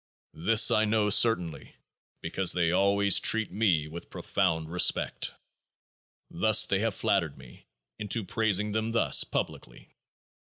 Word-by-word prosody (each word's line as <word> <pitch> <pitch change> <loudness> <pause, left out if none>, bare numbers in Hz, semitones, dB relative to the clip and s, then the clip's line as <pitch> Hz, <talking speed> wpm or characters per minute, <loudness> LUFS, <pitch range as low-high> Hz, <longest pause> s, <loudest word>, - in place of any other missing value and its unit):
This 110 +7 +3
I 110 - +2
know 105 -1 -1
certainly, 100 -7 +1 0.5
because 90 +2 0
they 85 -2 -1
always 100 +1 +2
treat 110 -1 +1
me 90 -7 0
with 85 +2 -11
profound 80 -5 -3
respect. 90 - 0 1.0
Thus 110 +4 +3
they 95 - -1
have 110 -1 -3
flattered 85 -7 -2
me 65 -2 -17 0.3
into 105 +1 -3
praising 105 -1 -1
them 110 +2 -3
thus 115 - +4
publicly. - - -7
100 Hz, 125 wpm, -26 LUFS, 85-110 Hz, 1.0 s, thus